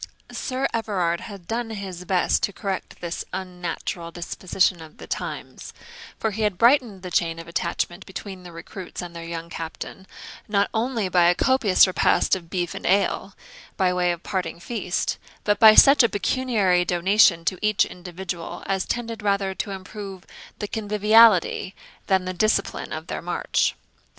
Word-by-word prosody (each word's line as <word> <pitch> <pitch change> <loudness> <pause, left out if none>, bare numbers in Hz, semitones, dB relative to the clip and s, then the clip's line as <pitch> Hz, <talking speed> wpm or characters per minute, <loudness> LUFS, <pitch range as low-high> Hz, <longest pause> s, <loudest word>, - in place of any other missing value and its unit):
Sir 260 0 -2
Everard 185 -7 0
had 200 -4 -10
done 230 0 -2
his 190 -4 -6
best 180 0 +2
to - - 0
correct 195 -1 -5
this 175 -1 -4
unnatural 180 -2 -5
disposition 175 +1 -1
of 160 -1 -13
the - - -10
times; - - -6 0.4
for 220 - -1
he 215 +2 -4
had 210 -4 +1
brightened 235 -5 +3
the 180 - -6
chain 165 -1 +1
of 165 0 -9
attachment 175 +1 -3
between 190 0 -7
the 180 -1 -11
recruits 180 +2 -8
and 170 -1 -9
their 170 - -6
young 165 0 -6
captain, 165 +3 -7 0.4
not 200 -1 +1
only 225 -2 0
by 180 -1 +4
a 175 +1 +5
copious 255 -7 +4
repast 185 0 +2
of 170 -3 -9
beef 175 -2 -2
and - - -5
ale, 195 +1 +1 0.4
by 185 -1 +2
way 180 -1 +2
of 170 0 -5
parting 185 -4 -3
feast, 180 0 -2 0.2
but 205 -1 +1
by 220 -1 +9
such 275 +1 +8
a 235 - +4
pecuniary 205 -5 +1
donation 175 0 +3
to 185 0 -1
each 215 -1 +3
individual 175 -1 -7
as 190 -1 -1
tended 230 -2 -3
rather 200 -2 0
to 195 - -4
improve 195 0 -8 0.3
the 210 - -4
conviviality 210 -2 +4 0.3
than 190 -2 +2
the 185 - -3
discipline 215 +4 0
of - - -5
their - - -5
march. - - 0
190 Hz, 165 wpm, -24 LUFS, 175-210 Hz, 0.4 s, by